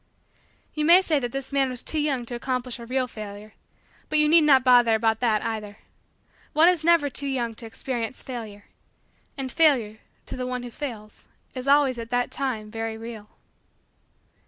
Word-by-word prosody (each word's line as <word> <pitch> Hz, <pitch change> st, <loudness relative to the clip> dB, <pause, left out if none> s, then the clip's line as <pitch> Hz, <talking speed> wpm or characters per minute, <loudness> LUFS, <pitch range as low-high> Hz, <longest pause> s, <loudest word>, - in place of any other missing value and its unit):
You 305 Hz, -, -1 dB
may 345 Hz, +4 st, +7 dB
say 310 Hz, -5 st, +1 dB
that 245 Hz, -3 st, -4 dB
this 270 Hz, +1 st, -6 dB
man 275 Hz, -1 st, +1 dB
was 250 Hz, -2 st, -5 dB
too 315 Hz, -, -2 dB
young 275 Hz, -5 st, -1 dB
to 240 Hz, -, -7 dB
accomplish 250 Hz, 0 st, -3 dB
a 235 Hz, -, -9 dB
real 255 Hz, +1 st, 0 dB
Failure. 210 Hz, -1 st, -9 dB, 0.6 s
But 310 Hz, -, +2 dB
you 300 Hz, 0 st, +5 dB
need 325 Hz, +2 st, +6 dB
not 270 Hz, -3 st, +5 dB
bother 245 Hz, -3 st, +5 dB
about 220 Hz, 0 st, +1 dB
that, 225 Hz, -4 st, +1 dB
either. 210 Hz, -2 st, -5 dB, 0.8 s
One 315 Hz, +3 st, +5 dB
is 355 Hz, -3 st, +3 dB
never 335 Hz, -3 st, +4 dB
too 280 Hz, +1 st, -3 dB
young 245 Hz, -4 st, -2 dB
to 225 Hz, +1 st, -9 dB
experience 235 Hz, +1 st, -5 dB
Failure. 220 Hz, -5 st, -8 dB, 0.7 s
And 265 Hz, -2 st, -4 dB
Failure, 240 Hz, -10 st, +2 dB, 0.3 s
to -, -, -7 dB
the 255 Hz, 0 st, -4 dB
one 250 Hz, -1 st, -4 dB
who 245 Hz, -, -8 dB
fails, 225 Hz, -6 st, -8 dB, 0.3 s
is 255 Hz, 0 st, -6 dB
always, 275 Hz, -3 st, +3 dB
at 230 Hz, 0 st, -7 dB
the 245 Hz, 0 st, 0 dB
time, 225 Hz, -6 st, -3 dB
very 225 Hz, 0 st, -4 dB
real. 225 Hz, -2 st, -9 dB
250 Hz, 180 wpm, -25 LUFS, 225-275 Hz, 0.8 s, may